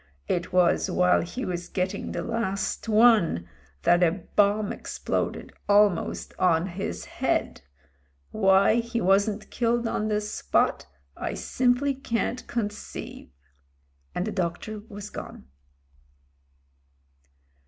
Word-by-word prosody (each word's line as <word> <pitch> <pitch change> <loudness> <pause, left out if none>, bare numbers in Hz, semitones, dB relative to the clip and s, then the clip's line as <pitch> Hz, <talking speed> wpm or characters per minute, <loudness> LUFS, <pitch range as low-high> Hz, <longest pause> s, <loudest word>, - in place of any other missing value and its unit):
It 175 0 -1
was 180 +1 +3
while 180 0 +3
he 245 +10 -5
was 175 -1 -4
getting 190 +1 -2
the - - -3
last 230 -2 -2
one 215 - +4 0.4
that 175 +1 +4
a 175 +1 +2
bomb 205 +1 +3
exploded - - -3 0.2
almost 205 -2 +2
on 170 -2 +3
his 175 - -5
head. - - -1 0.7
Why 195 +1 +4
he 235 0 -1
wasn't 200 +2 +1
killed 235 0 +1
on 215 -1 -1
the 210 -1 +1
spot, 210 - 0 0.3
I - - -4
simply 255 +3 +1
can't 250 -1 -2
conceive." 210 -3 -5 0.9
And 180 - -1
the 215 - -2
doctor 190 +4 -3
was 205 0 -8
gone. - - -8
205 Hz, 110 wpm, -26 LUFS, 180-230 Hz, 0.9 s, one